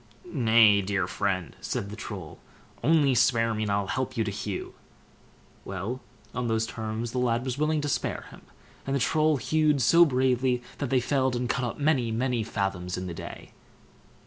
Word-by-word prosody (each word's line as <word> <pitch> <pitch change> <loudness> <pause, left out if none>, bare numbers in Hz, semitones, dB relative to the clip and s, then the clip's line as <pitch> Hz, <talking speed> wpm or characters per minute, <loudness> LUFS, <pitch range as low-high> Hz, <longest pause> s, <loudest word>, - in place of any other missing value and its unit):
"Nay, 115 - +5
dear 100 -1 0
friend!" 95 -4 -2
said 100 - -3
the - - -6
Troll, 95 -7 -7 0.4
"only 145 -1 +4
spare 115 -2 +3
me, 110 - -3
and 105 -1 -1
I'll 100 0 +1
help 130 +7 -3
you 115 - +2
to 105 - -3
hew." 100 0 -5 0.9
Well, 100 +7 -4 0.3
on 125 0 -2
those 110 0 +1
terms 110 0 -4
the 125 - -2
lad 120 0 +1
was 130 +1 -3
willing 155 0 +1
to 145 - -2
spare 145 - -2
him, - - -13 0.5
and 135 - 0
the - - +1
Troll 155 +5 +2
hewed 155 0 +2
so 165 +8 +6
bravely, 130 -3 +1 0.2
that 140 - -2
they 130 -1 +3
felled 130 0 +1
and 120 0 -1
cut 125 - 0
up 120 - -4
many, 140 -5 +2
many 120 +1 0
fathoms 95 -4 -2
in 90 - -4
the 90 - -5
day. - - -9
120 Hz, 185 wpm, -27 LUFS, 105-130 Hz, 0.9 s, so